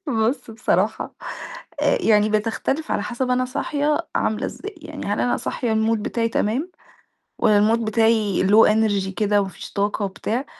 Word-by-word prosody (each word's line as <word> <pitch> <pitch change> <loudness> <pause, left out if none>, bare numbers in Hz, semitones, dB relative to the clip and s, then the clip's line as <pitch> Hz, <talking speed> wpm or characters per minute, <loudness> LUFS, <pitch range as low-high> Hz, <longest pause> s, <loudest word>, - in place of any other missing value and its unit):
بُص 240 +1 0
بصراحة، 225 - -1 0.7
آآ - - +3
يعني 210 -1 +4
بتختلف 225 +8 -1
على - - 0
حسب 245 +4 -3
أنا 250 0 +2
صاحية 295 +4 -1
عاملة 215 +1 0
إزاي، 410 +1 -7
يعني 310 -2 -8
هل 205 - -1
أنا 245 - +1
صاحية 240 -3 -2
المود 220 0 +1
بتاعي 230 +1 -1
تمام، 245 - -1 0.7
والّا 215 -3 +4
المود 225 +2 +2
بتاعي 215 -3 +2
low 215 +3 +6
energy 210 -3 +1
كده 210 -1 +2
وما 195 - -3
فيش - - -11
طاقة 205 +1 0
وبتاع 225 +6 -3
225 Hz, 160 wpm, -22 LUFS, 210-250 Hz, 0.7 s, low